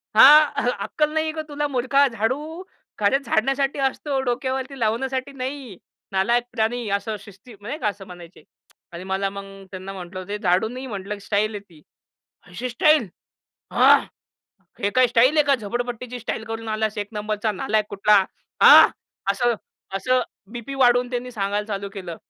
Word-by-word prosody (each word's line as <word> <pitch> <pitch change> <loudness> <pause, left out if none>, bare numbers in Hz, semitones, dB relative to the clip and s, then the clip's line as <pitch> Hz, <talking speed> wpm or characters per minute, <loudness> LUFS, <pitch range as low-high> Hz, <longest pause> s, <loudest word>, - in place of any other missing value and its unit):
हां. 290 +1 +7
"अक्कल 300 0 -1
नाहीये 315 0 0
का 315 - -4
तुला 295 0 -2
मूर्खा? 275 +1 +2
झाडू 275 - -3 0.4
घरे 210 +6 +3
झाडण्यासाठी 270 +2 0
असतो 270 +1 -1
डोक्यावरती 260 +2 -3
लावण्यासाठी 260 +4 -1
नाही. 260 -5 -6 0.3
नालायक 235 +6 +2
प्राणी," 230 0 -1
असं 215 +2 -5
शिस्ती 205 +4 -15
मग 205 - -10
नाही 295 +6 -4
का 225 - -1
असं 200 -1 -4
म्हणायचे. 175 -1 -13 0.5
आणि 170 +1 -8
मला 190 +1 -1
मग 200 0 -8 0.3
त्यांना 190 0 -7
म्हटलं, 185 0 -8
"ते 205 +1 -3
झाडू 190 0 +1
नाही 255 +3 -7
म्हटलं, 200 -3 -5
की - - -13
स्टाईल 215 +1 0
आहे - - -4
ती. 160 -3 -18 0.7
अशी 205 +8 -5
स्टाईल." 300 -1 +3 0.6
हां. - - +6 0.8
"हे 200 - 0
काय 255 +3 +4
स्टाईल 245 +6 +4
आहे 300 - +5
का? 280 - +4
झोपडपट्टीची 245 +1 -4
स्टाईल 220 -1 -4
करून 225 0 -6
आलास. 215 0 -2
एक 205 -1 -3
नंबरचा 215 0 -2
नालायक 215 -1 0
कुठला." 205 +1 +4 0.5
हां. - - +10 0.4
असं, 240 +4 +1 0.4
असं 255 +6 +1 0.3
बीपी 240 +3 -6
वाढून 245 -2 +3
त्यांनी 250 0 -4
सांगायला 205 -2 -2
चालू 200 -2 -4
केलं. 180 -4 -7
230 Hz, 160 wpm, -23 LUFS, 205-265 Hz, 0.8 s, हां